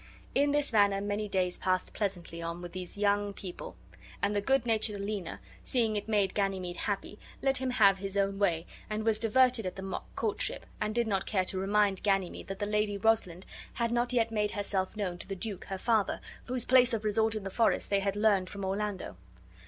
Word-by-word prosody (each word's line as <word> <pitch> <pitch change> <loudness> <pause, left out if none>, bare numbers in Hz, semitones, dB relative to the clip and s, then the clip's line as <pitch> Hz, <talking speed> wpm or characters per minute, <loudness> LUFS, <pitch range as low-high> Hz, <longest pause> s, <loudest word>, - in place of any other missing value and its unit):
In 285 +1 +3
this 290 -3 +1
manner 200 -2 +4
many 205 +1 -2
days 185 -2 0
passed 185 0 0
pleasantly 175 -5 -3
on 170 +1 -4
with 175 - -7
these 185 +1 -6
young 205 0 +1
people; 185 -2 -8 0.4
and 205 +1 +1
the 205 - +2
good 270 +3 +2
natured 220 -2 +1
Aliena, 200 -3 -4 0.2
seeing 230 -4 +1
it 205 0 -2
made 205 -3 +2
Ganymede 190 -3 -1
happy, 205 0 -3 0.2
let 270 -1 +3
him 260 0 -1
have 200 -6 +5
his 195 0 -4
own 195 0 +1
way 170 -5 +1 0.2
and 215 0 -2
was 220 -1 +2
diverted 240 -1 +3
at 185 - -5
the 190 - -7
mock 190 - -5
courtship, 220 -3 -2 0.2
and 215 +1 -1
did 235 0 +2
not 195 -4 -1
care 190 -3 +1
to 185 - -2
remind 200 0 +2
Ganymede 195 -3 0
that 195 - -5
the 205 - -2
Lady 210 0 0
Rosalind 195 -4 +1 0.3
had 235 -1 -1
not 240 +1 +1
yet 230 -2 +2
made 210 -1 +1
herself 200 -1 -2
known 180 -4 -2
to - - -7
the 195 - -4
duke 195 -1 -5
her 195 - -4
father, 220 -1 +1 0.3
whose 255 -1 0
place 255 -1 +5
of 220 -1 -1
resort 220 +1 +2
in 215 - -4
the 195 - -5
forest 225 0 +1
they 200 - +4
had 195 0 -1
learned 205 -3 +3
from 200 -1 -5
Orlando. 195 - -3
205 Hz, 210 wpm, -30 LUFS, 195-220 Hz, 0.4 s, have